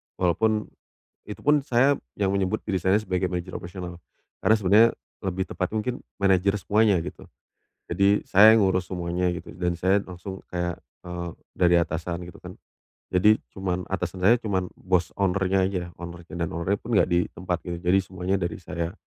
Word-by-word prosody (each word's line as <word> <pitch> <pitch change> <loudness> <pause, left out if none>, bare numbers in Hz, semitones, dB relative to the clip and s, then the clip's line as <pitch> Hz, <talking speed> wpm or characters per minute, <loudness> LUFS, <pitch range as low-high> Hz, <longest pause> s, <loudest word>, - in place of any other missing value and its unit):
walaupun 105 +5 +1 0.6
itupun 145 -1 +1
saya 130 +2 +4 0.2
yang 100 -1 +1
menyebut 100 +2 0
diri 95 -3 0
saya 95 +3 +4
sebagai 95 -3 -1
manajer 90 0 -4
operasional, 90 -1 -7 0.4
karena 110 - +5
sebenarnya 105 +3 +6 0.4
lebih 95 0 -1
tepatnya 95 +4 -3
mungkin 125 +2 -2 0.2
manajer 95 0 +3
semuanya, 105 +1 +3
gitu. - - -8 0.6
Jadi 100 +1 +3
saya 105 +3 +8
ngurus 95 -2 +1
semuanya 90 0 -1
gitu, 90 - -7
dan 90 -1 -1
saya 95 +2 +3
langsung 95 +1 -8
kayak, 90 -1 -2 0.3
eee, 90 -1 -4 0.3
dari 90 -1 +4
atasan 85 +1 -2
gitu 90 - -12
kan. - - -9 0.6
Jadi 105 +4 +6 0.2
cuma 90 -2 -2
atasan 90 -1 -3
saya 115 +4 +6
cuma 100 -5 0 0.2
boss 90 -2 0
owner-nya 95 0 +2
aja, 95 -2 -2 0.2
owner-nya, 85 -1 -9
dan 85 -2 -2
owner-nya 95 +4 -1
pun 115 0 -2
enggak - - +3
di 85 0 +2
tempat 90 0 -2
gitu, 85 - -3
jadi 90 +2 +4
semuanya 95 +1 -2
dari 85 - -2
saya. 85 +1 -4
95 Hz, 165 wpm, -25 LUFS, 90-100 Hz, 0.6 s, saya